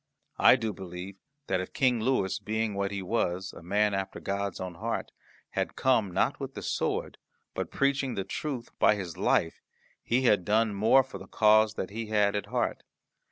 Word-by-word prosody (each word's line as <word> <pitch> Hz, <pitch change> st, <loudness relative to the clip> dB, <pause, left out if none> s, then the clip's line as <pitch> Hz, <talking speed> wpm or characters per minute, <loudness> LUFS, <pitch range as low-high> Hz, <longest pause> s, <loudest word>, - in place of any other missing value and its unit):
I -, -, +8 dB
do 115 Hz, -4 st, -2 dB
believe 95 Hz, +1 st, -8 dB, 0.3 s
that 95 Hz, -1 st, 0 dB
if 95 Hz, -, -8 dB
King 125 Hz, -3 st, +2 dB
Louis, 110 Hz, -6 st, +1 dB
being 110 Hz, 0 st, -2 dB
what 100 Hz, 0 st, -1 dB
he 100 Hz, -1 st, -4 dB
was, 95 Hz, -2 st, -1 dB
a -, -, -11 dB
man 105 Hz, +4 st, +1 dB
after 95 Hz, 0 st, -3 dB
God's 100 Hz, -1 st, -3 dB
own 90 Hz, -1 st, -5 dB
heart, 85 Hz, -, -3 dB, 0.4 s
had -, -, -2 dB
come, 125 Hz, -6 st, +2 dB
not -, -, +1 dB
with -, -, -6 dB
the -, -, -6 dB
sword, -, -, -2 dB, 0.3 s
but -, -, -3 dB
preaching 140 Hz, -2 st, 0 dB
the 100 Hz, -, -2 dB
truth 130 Hz, +1 st, -5 dB
by 105 Hz, -, +5 dB
his 90 Hz, -5 st, -6 dB
life, 80 Hz, -, +1 dB, 0.4 s
he 125 Hz, +3 st, +1 dB
had 105 Hz, -7 st, +4 dB
done 110 Hz, +3 st, +2 dB
more 110 Hz, +7 st, +5 dB
for 125 Hz, -7 st, -9 dB
the 95 Hz, -, -11 dB
cause 110 Hz, 0 st, +4 dB
that 95 Hz, -, -4 dB
he 110 Hz, +1 st, -5 dB
had 105 Hz, -1 st, +2 dB
at 100 Hz, -1 st, -2 dB
heart. -, -, -1 dB
105 Hz, 190 wpm, -29 LUFS, 95-115 Hz, 0.4 s, I